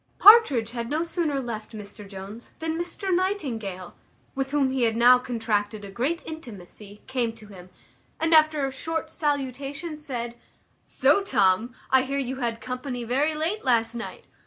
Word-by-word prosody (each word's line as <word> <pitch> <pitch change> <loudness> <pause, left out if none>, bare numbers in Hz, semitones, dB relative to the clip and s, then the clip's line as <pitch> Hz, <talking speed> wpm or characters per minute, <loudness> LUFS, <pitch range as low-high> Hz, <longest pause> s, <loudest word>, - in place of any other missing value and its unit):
Partridge 335 - +7
had 235 -1 -4
no 310 +3 0
sooner 330 -4 -1
left 230 -4 -6
Mr 205 -1 -10
Jones 200 +4 -9
than 320 0 -2
Mr 350 +3 -2
Nightingale, 235 - -2 0.4
with 270 0 -2
whom 275 -2 +1
he 265 -1 -1
had 225 -2 +2
now 245 +2 +7
contracted 215 -4 -2
a 195 - -9
great 275 - -1
intimacy, 210 - -10
came 250 -3 -1
to 225 -1 -14
him, 185 -2 -12 0.5
and, 325 0 +2
after 310 -2 +5
a 270 - -3
short 320 +4 -4
salutation, 285 +2 -3
said, 240 -5 -5 0.5
"So, 400 - +3
Tom, 220 - +2 0.2
I 265 0 +6
hear 275 +2 -3
you 260 -1 -2
had 235 -3 -2
company 250 0 -5
very 275 +7 +1
late 330 +8 -2
last 230 -3 +2
night. 235 -1 -7
255 Hz, 160 wpm, -25 LUFS, 225-305 Hz, 0.5 s, Partridge